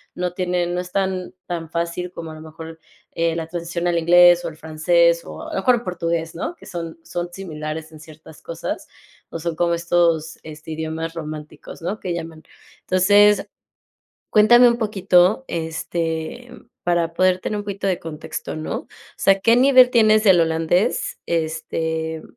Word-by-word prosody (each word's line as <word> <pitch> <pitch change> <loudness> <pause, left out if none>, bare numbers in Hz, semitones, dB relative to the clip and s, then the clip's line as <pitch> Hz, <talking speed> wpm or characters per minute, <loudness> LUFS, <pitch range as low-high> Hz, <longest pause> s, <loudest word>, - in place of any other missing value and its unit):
No 180 -1 -2
tiene 180 -1 -1
no 175 +1 -2
es 180 0 -6
tan 190 -2 -1
tan 165 -2 -4
fácil, 170 +2 -3
como 165 -3 -8
a - - -9
lo 155 - -11
mejor, 160 +1 -10 0.3
eh, 165 0 0
la 165 -1 -4
transición 170 +1 -3
al 170 -1 +1
inglés, 175 +1 +6
o - - -2
el 155 - -12
francés, 170 +2 +2
o - - -9
a 320 0 -8
lo - - -1
mejor, 240 -2 +2
portugués, 170 -2 -2
¿no? 325 - -4
Que - - -17
son 165 -2 -6
son 175 +1 -4
similares 155 -3 -6
en 155 - -13
ciertas 155 0 -15
cosas. 165 -1 -5 0.4
O 165 - -6
son 165 0 -3
como 170 -1 +1
estos 170 -2 +1
este, 155 +1 -10
idiomas 160 +1 -4
románticos, 155 -1 -8
¿no?, 200 +5 -3
que 180 - -3
llaman. 165 -2 -7 0.4
Entonces, 205 +3 +4 0.9
cuéntame 240 +3 +7
un 235 - +1
poquito, 195 0 +3
este, 165 +5 -3 0.4
para 170 -1 +1
poder 185 0 +2
tener 210 +2 -3
un 205 - -5
poquito 200 -1 -4
de 185 - 0
contexto, 160 -1 -6
¿no? 155 - -5
O - - -34 0.3
sea, 195 0 +3
¿qué 230 +3 +4
nivel 255 -1 +6
tienes 215 -3 +4
del 185 -4 +6
holandés? 175 - 0
Este, 160 0 -2
170 Hz, 170 wpm, -21 LUFS, 160-185 Hz, 0.9 s, cuéntame